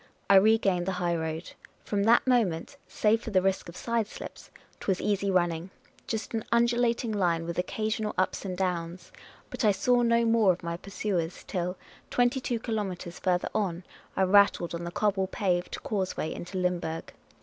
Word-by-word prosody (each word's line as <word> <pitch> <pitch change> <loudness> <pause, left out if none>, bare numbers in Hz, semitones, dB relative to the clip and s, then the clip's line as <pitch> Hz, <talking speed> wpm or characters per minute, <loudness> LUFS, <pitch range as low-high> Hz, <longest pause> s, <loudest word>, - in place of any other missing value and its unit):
I 195 - +9
regained 195 -3 +3
the 190 - 0
highroad. 170 -2 -2 0.3
From 200 -1 0
that 235 +2 +5
moment, 230 - +1
save 220 +1 +2
for 230 - -6
the 195 -4 +4
risk 195 -2 0
of 170 - -11
sideslips, 230 -2 -4 0.3
't - - -10
was 190 -2 +2
easy 200 -1 0
running 175 -1 +1 0.2
— - - -31
just 220 0 -3
an 225 -1 -1
undulating 235 0 +2
line 175 -5 +1
with 170 +1 -3
occasional 215 +3 -2
ups 185 - 0
and 185 -2 -4
downs; 175 -1 -3 0.4
but - - -4
I 210 - +6
saw 245 +5 +2
no 235 0 +3
more 225 -4 +4
of 175 - -11
my 170 0 -2
pursuers 185 -2 -3
till, 180 -1 -3 0.3
twenty 245 +2 +2
two 240 -2 -1
kilomeLres 195 -7 -4
farther 180 -2 0
on, 185 -4 -1 0.3
I 190 - +4
rattled 190 -3 +4
on 170 0 -4
the 170 - -4
cobble 195 0 +1
paved 180 -2 -1
cause 190 -4 -2
way 160 - -2
into 180 +2 -6
lyimburg. 175 -3 -2
190 Hz, 175 wpm, -28 LUFS, 175-220 Hz, 0.4 s, I